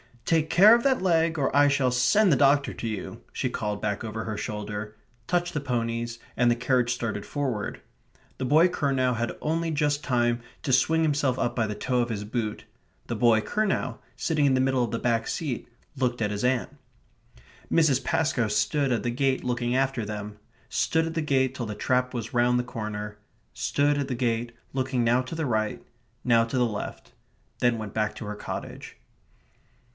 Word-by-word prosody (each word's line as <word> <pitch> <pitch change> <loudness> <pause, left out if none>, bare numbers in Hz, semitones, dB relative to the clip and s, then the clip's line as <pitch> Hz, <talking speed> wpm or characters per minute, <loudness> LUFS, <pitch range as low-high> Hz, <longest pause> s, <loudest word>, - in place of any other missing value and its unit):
"Take 160 -2 +2
care 205 +6 +8
of 235 - +4
that 265 -5 +2
leg, 165 -3 +2
or 140 -2 0
I 145 0 +6
shall 140 -3 +2
send 170 - +4
the 140 - +4
doctor 140 +1 +3
to 115 - -5
you," 110 -3 -5
she - - -1
called 105 -1 -3
back 105 -2 -1
over 110 0 -4
her 110 -2 -4
shoulder; 105 0 -5 0.3
touched 175 0 0
the 150 - -1
ponies; 120 -3 -2 0.2
and 120 0 +4
the 120 - +3
carriage 125 -1 +1
started 110 -5 -2
forward. 130 -8 -3 0.6
The 130 - -1
boy 155 +7 +5
Curnow 135 -6 +1
had 115 0 -3
only 165 +2 0
just 145 -1 0
time 120 -2 +1 0.2
to 145 - -1
swing 160 +5 +3
himself 145 -4 +1
up 120 -1 -1
by 115 -3 +1
the 105 - -4
toe 125 +4 0
of 120 0 0
his 105 -3 -3
boot. 110 0 -3 0.4
The 120 - -2
boy 115 -1 +4
Curnow, 215 - -1 0.2
sitting 155 -3 +1
in 135 - +4
the 130 - +3
middle 130 -1 +2
of 115 - -2
the 115 - -1
back 115 -2 0
seat, 145 -8 -3 0.3
looked 125 -2 0
at 105 -2 0
his 105 +3 -2
aunt. 125 -1 +1 1.0
Mrs. 155 -6 +3
Pascoe 140 -7 +1
stood 130 +7 +1
at 115 -3 0
the 120 - 0
gate 135 +1 0
looking 120 0 -1
after 135 -4 0
them; 105 0 -6 0.3
stood 160 0 +1
at 165 - -4
the 165 - -1
gate 130 -3 +1
till 125 -2 -4
the 105 - -5
trap 125 +2 0
was 115 -2 -5
round 120 0 +3
the 125 - +1
corner; 105 -3 -5 0.3
stood 145 0 +1
at 140 - -1
the 130 - -2
gate, 120 -1 -1 0.2
looking 130 -2 0
now 120 +2 +3
to 130 +5 -7
the 160 -1 -2
right, 110 -4 -1 0.4
now 115 -2 +4
to 115 +3 -3
the 125 - +3
left; 105 -3 -5 0.5
then 120 -1 +2
went 110 -2 -6
back 110 -1 -1
to - - -7
her 105 0 -5
cottage. - - -7
125 Hz, 195 wpm, -26 LUFS, 115-145 Hz, 1.0 s, care